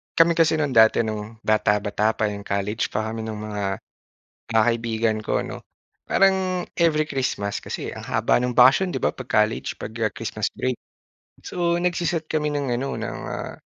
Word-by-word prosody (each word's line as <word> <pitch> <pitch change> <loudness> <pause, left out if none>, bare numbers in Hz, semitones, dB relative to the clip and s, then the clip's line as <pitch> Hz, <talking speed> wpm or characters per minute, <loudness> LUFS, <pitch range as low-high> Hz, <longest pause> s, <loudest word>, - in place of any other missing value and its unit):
kami 165 0 +6
kasi 160 -1 +4
no'ng 150 -3 0
dati 110 +1 +6
no'ng 110 +1 -6
bata-bata 105 0 +1
pa 105 -1 0
'yong 100 0 -7
college 100 +2 -1
pa 110 +1 -1
kami 110 0 -5
nung 105 -1 -5
mga, 100 -2 -3 0.8
ah, 110 - +6
kaibigan 115 -1 0
ko 110 - -1
'no, - - -7 0.5
parang 190 -2 +2 0.2
every 155 -2 +3
Christmas 130 -8 -2
kasi - - -5
ang - - -8
haba - - +2
ng 125 0 -1
bakasyon 135 +9 +5
'di - - -2
ba - - +2
'pag 130 -1 -9
college 110 +1 -3
pag, - - -6
ah, 110 - +3
Christmas 110 -2 -2
break. 130 -1 -1 0.7
So 170 -1 0
nagse-set 175 -2 0
kami 150 -1 0
ng 140 -4 -1
ano 135 +1 -3
ng, - - -4
ah, - - -5
115 Hz, 175 wpm, -23 LUFS, 110-155 Hz, 0.8 s, kami